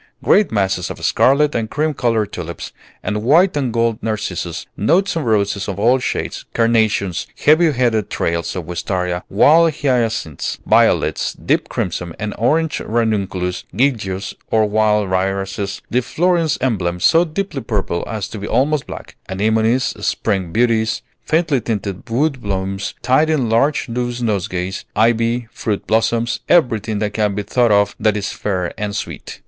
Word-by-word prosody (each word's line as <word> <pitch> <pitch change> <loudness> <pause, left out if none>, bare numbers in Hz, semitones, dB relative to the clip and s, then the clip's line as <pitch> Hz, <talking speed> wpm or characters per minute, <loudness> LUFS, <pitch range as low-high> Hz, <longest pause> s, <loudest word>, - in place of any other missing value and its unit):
Great 210 -2 +4
masses 95 -4 0
of - - -6
scarlet 145 +3 +3
and 110 -2 -2
cream 155 +1 0
colored 115 -5 0
tulips, 85 -1 -6 0.3
and 105 0 -2
white 160 - +4
and 135 -4 0
gold 115 -1 0
narcissus, 105 -6 -3
knots 180 - +2
of 165 - 0
roses 100 -3 0
of 100 -2 -4
all 120 +5 +3
shades, - - -3
carnations, 110 -6 +1 0.2
heavy 155 +2 +5
headed 115 -6 0
trails 85 0 -2
of 90 -3 -4
wistaria, 90 +1 -2
wild 160 +10 +5
hyacinths, 120 - -1
violets, - - +2
deep - - -1
crimson 85 -1 -3
and 105 0 -4
orange 155 +7 +1
ranunculus, 100 -6 -1
giglios, 105 -7 0 0.2
or 110 -1 +3
wild 105 -2 +1
irises, 95 +1 -2
the 125 - +2
Florence 170 +4 +1
emblem, 95 -9 -1
so 165 - +5
deeply 165 -3 -4
purple 100 -6 -2
as 105 -3 -4
to 110 - -8
be 100 - -5
almost 140 +5 +1
black, - - -9
anemones, 110 +5 +1 0.2
spring 95 -6 -1
beauties, 115 0 +1 0.2
faintly 155 -5 +1
tinted 105 -1 -4
wood 135 +3 0
blooms 95 -1 -3
tied 150 +5 +3
in 140 -7 +1
large 135 +6 +2
loose 120 0 -3
nosegays, 95 -4 -2
ivy, 115 +2 +2
fruit 105 -3 -3
blossoms, 115 +1 +1
everything 115 - +2
that 105 0 -2
can 105 -2 0
be 105 - -2
thought 120 +2 +2
of 100 0 +3
that 105 -1 +2
is 100 - -3
fair 90 -4 -2
and 105 -1 -3
sweet. - - -6
110 Hz, 150 wpm, -18 LUFS, 100-125 Hz, 0.3 s, heavy